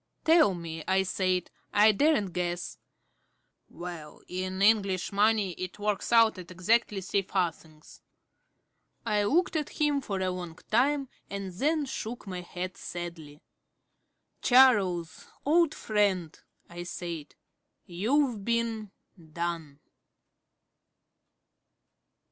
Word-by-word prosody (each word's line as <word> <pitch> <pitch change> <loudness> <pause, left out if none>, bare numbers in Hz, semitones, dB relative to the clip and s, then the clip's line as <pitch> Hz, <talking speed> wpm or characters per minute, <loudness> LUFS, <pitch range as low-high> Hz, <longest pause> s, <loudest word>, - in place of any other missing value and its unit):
"Tell 320 - +5
me," 165 -2 -6
I 190 0 +3
said. 185 -1 -1 0.2
"I 210 +1 +6
daren't 210 - +2
guess." 175 0 -3 0.9
"Well, 170 -4 -9
in 185 +1 -4
English 200 -4 +3
money 205 -1 +2
it 185 +1 -5
works 210 +1 -2
out 230 -4 +5
at 175 - -10
exactly 195 +3 +1
three 195 +2 0
farthings." 165 -5 -4 1.0
I 210 -1 +1
looked 335 - +2
at 300 -2 -3
him 295 -2 +2
for 200 -6 -3
a 185 -1 0
long 175 -2 -6
time 275 +4 +2 0.2
and 195 -2 -5
then 295 - +1
shook 240 -3 -6
my 185 -2 -5
head 180 +1 -6
sadly. 170 -4 -7 1.0
"Charles, 195 - +4 0.2
old 325 +1 +3
friend," 200 -6 0 0.3
I 175 0 -8
said, 170 -3 -6 0.5
"you've 225 +5 0
been 230 -2 -1 0.4
done." 165 -4 -4
190 Hz, 110 wpm, -29 LUFS, 175-230 Hz, 1.0 s, I